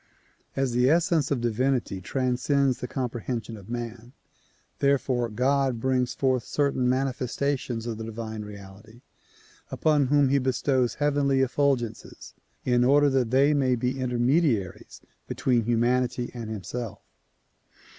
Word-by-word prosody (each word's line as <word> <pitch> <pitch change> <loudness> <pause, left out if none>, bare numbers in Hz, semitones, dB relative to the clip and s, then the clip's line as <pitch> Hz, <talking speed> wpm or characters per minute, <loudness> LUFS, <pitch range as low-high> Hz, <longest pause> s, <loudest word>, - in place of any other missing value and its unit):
As 135 -2 0
the 125 +2 +3
essence 165 -2 +2
of 140 -4 -1
divinity 120 -4 0
transcends 130 +2 0
the 125 - -4
comprehension 120 -3 -4
of 100 0 -13
man, 120 0 -6 0.7
therefore 130 -3 +1
God 130 +2 +1
brings 125 -1 0
forth 130 -2 +1
certain 140 -4 0
manifestations 130 -2 -1
of 115 -2 -4
the - - -4
divine 110 -1 -6
reality 105 +2 -12 0.7
upon 150 -3 +2
whom 145 0 +3
he 140 +1 +3
bestows 130 -1 0
heavenly 140 -2 +1
effulgences 130 -4 -2 0.3
in 125 -1 +3
order 145 +2 +4
that 130 -3 +1
they 135 +4 +4
may 130 -3 +2
be 125 +3 -2
intermediaries 125 - 0 0.3
between 120 -4 0
humanity 120 +1 0
and 115 -3 -6
himself. 110 +2 -6
125 Hz, 125 wpm, -26 LUFS, 120-135 Hz, 0.7 s, order